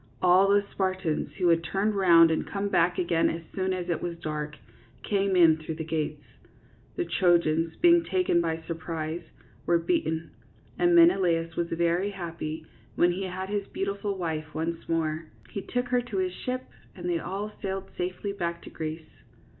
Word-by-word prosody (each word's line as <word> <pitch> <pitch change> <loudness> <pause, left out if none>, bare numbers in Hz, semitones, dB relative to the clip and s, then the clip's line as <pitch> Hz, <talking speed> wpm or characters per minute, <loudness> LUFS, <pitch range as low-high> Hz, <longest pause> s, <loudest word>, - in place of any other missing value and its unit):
All 185 +2 +5
the 200 0 +4
Spartans, 185 -4 -1
who 180 -2 +3
had 165 0 +3
turned 195 +6 0
round 170 -4 +6
and 160 - -1
come 200 0 -2
back 175 -1 +2
again 170 -2 +2
as 165 0 -4
soon 190 0 -1
as 180 -1 -3
it 170 - -1
was 170 -1 -4
dark, 150 -2 -4 0.5
came 195 -2 +1
in 165 -3 +6
through 155 0 -6
the 160 - -4
gates. 155 -2 -3 0.7
The 355 - -1
Trojans, 165 - +2
being 345 -1 +5
taken 365 - +2
by 165 -1 -1
surprise, 160 0 -4 0.5
were 170 - +4
beaten; 165 - -1 0.5
and 350 0 +4
Menelaus 175 - +4
was 170 - 0
very 170 +3 +1
happy 165 -4 -5 0.3
when 175 - +4
he 190 +2 -3
had 185 +1 -5
his 205 -1 -2
beautiful 200 0 -3
wife 155 -3 -4
once 165 +1 -3
more. 160 -1 -1 0.3
He 200 - -4
took 245 +4 -2
her 250 -1 +2
to 235 -5 -5
his 185 -1 0
ship 255 +5 -4 0.3
and 175 -1 -6
they 170 -1 +1
all 195 +5 -4
sailed 195 -1 -4
safely 185 +3 -3
back 170 -3 -3
to - - -10
Greece. 160 0 -7
175 Hz, 175 wpm, -27 LUFS, 165-195 Hz, 0.7 s, round